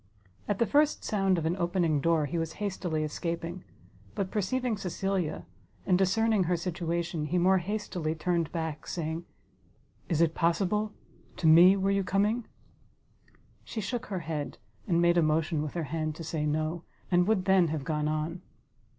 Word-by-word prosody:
At 205 - 0
the 235 - +3
first 295 +4 +2
sound 195 -3 +1
of 165 - -2
an 165 +2 +1
opening 170 -4 +1
door, 165 -1 +2
he 170 +4 -2
was 165 0 -3
hastily 180 -6 -2
escaping; 170 +3 -4 0.5
but 190 -1 -2
perceiving 235 +4 0
Cecilia, 190 -3 -2 0.4
and 185 - +3
discerning 195 +2 +2
her 175 +1 +1
situation, 170 -2 -2
he 175 +4 0
more 185 +2 +4
hastily 180 -4 -3
turned 170 0 0
back, 160 -3 -4
saying, 165 0 -3 0.8
"Is 165 -4 +1
it 165 -1 +3
possible? 190 +6 +1 0.5
To 180 - -3
me 175 +5 +8
were 195 0 +1
you 195 0 +1
coming?" 205 +5 +1 1.2
She 225 - -6
shook 240 +4 -3
her 190 -3 -3
head, 155 -3 -4 0.3
and 170 -2 +2
made 170 0 +4
a - - +4
motion 155 0 +1
with 150 +1 -5
her 170 - -1
hand 155 -2 -1
to 165 - -7
say 155 -1 -2
no, 155 +3 -1 0.3
and 175 0 +4
would 205 -4 +2
then 190 -3 +5
have 155 -2 -3
gone 150 0 -1
on. 155 +3 -2
175 Hz, 165 wpm, -29 LUFS, 160-195 Hz, 1.2 s, me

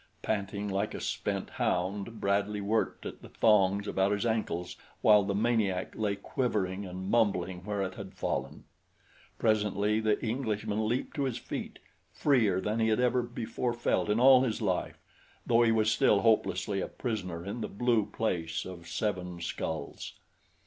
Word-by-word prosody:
Panting 100 -1 -2
like 100 +1 -1
a - - -4
spent - - -3
hound 100 +5 -1
Bradley 100 +1 0
worked 105 +3 -1
at - - -7
the - - -12
thongs 100 -2 +3
about 95 0 +1
his 105 +2 0
ankles 110 -6 -1 0.3
while 105 -1 +7
the 100 0 -1
maniac 105 -4 +1
lay 105 -2 0
quivering 100 -3 -2
and 90 +1 -6
mumbling 95 -6 +1
where 105 -2 -1
it 95 - -3
had - - -9
fallen. - - -3 0.7
Presently 105 -1 +1
the 110 -1 +1
Englishman 110 -3 -1
leaped 125 +7 -2
to 140 - +1
his 130 -3 -2
feet - - -6 0.3
freer 115 -10 +2
than 105 +4 -1
he 110 - +3
had 110 +1 +2
ever 125 0 +3
before 120 0 -3
felt 120 -2 0
in 105 +2 +2
all 130 0 +8
his 120 -4 0
life, 95 -5 -1 0.5
though 115 0 +4
he 115 -1 +4
was 110 -1 +3
still 105 -2 +4
hopelessly 105 -3 +2
a - - -2
prisoner 95 -8 -4
in 105 +4 -4
the - - -2
Blue 115 -1 +1
Place 85 -7 -2
of 85 -2 -9
Seven 90 -1 -2
Skulls. 80 -3 -4
105 Hz, 165 wpm, -30 LUFS, 95-115 Hz, 0.7 s, all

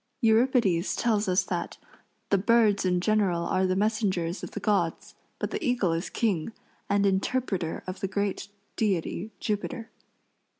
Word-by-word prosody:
Euripides 220 -6 +3
tells 215 -3 +1
us 185 +1 +3
that - - -4 0.5
"the 200 - +5
birds 215 -1 +3
in 180 -1 +2
general 195 -4 +2
are 185 +2 +1
the 185 - +1
messengers 195 -4 0
of - - -5
the - - -6
gods, 190 -5 0 0.2
but - - -3
the - - -3
eagle 240 -9 +1
is 165 +1 -2
king, 205 -5 -1 0.4
and 200 0 +3
interpreter 195 -3 -1
of 185 +1 -6
the 195 - -1
great 200 0 -2 0.3
deity 195 -1 -1
Jupiter." 220 +2 -3
200 Hz, 145 wpm, -27 LUFS, 185-220 Hz, 0.5 s, the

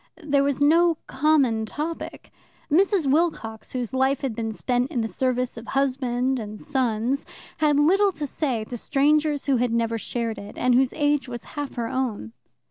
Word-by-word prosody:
There 285 -2 +2
was 280 -1 0
no 330 +4 +4
common 265 -6 +2
topic. 315 +7 -5 0.4
Mrs. 375 +1 +3
Wilcox, 270 -7 0
whose 250 -2 -3
life 265 +1 +1
had 265 -6 -2
been 225 0 -2
spent 245 +3 -1
in 250 -7 -1
the 225 - -1
service 250 0 -1
of 230 - -9
husband 260 -1 0
and 210 -1 -7
sons, 255 -1 -1 0.3
had 295 -2 +3
little 390 +7 +4
to 305 -2 -4
say 260 -5 -2
to 240 +3 -6
strangers 295 +2 +2
who 275 -2 +2
had 245 0 0
never 230 -1 0
shared 230 0 -3
it, 200 +1 -10
and 250 0 +2
whose 255 +1 +3
age 290 -2 +1
was 240 -1 -6
half 290 -2 -5
her 235 -2 -2
own. 230 - -3
265 Hz, 175 wpm, -24 LUFS, 235-295 Hz, 0.4 s, no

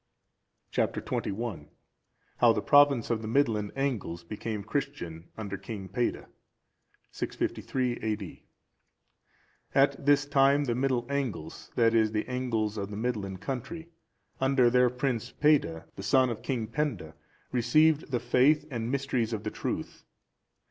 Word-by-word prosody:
Chap. - - +1
XXI. 100 -8 -3 0.7
How 120 -2 +6
the 110 - -1
province 145 -5 +5
of 110 -2 0
the 110 - -5
Midland 110 -5 +1
Angles 120 -11 -2
became 105 +3 -5
Christian 105 - -4
under 100 -3 -4
King 100 -2 -7
Peada. 120 +5 -1 0.9
[653 125 -2 -2
A.D.] 105 -4 -4 1.3
At 140 0 +3
this 145 0 +4
time, 140 0 +4
the 125 -4 0
Middle 125 -1 0
Angles, 120 - -4
that 115 -1 +4
is, 110 -1 +3
the 105 - -1
Angles 115 -4 -1
of 100 0 -4
the 105 - -6
Midland 105 -5 -3
country,(400) 145 +7 -5 0.5
under 130 -2 +4
their 125 0 +5
Prince 125 -2 -2
Peada, 140 - +2
the - - -7
son 130 +6 +3
of 110 - -5
King 120 -4 -2
Penda, 115 - -3 0.4
received 150 +6 +3
the 125 -3 0
faith 130 +6 +3
and 115 -2 -3
mysteries 130 -4 -1
of 105 -1 -3
the 110 - -3
truth. - - -4
120 Hz, 135 wpm, -29 LUFS, 105-135 Hz, 1.3 s, How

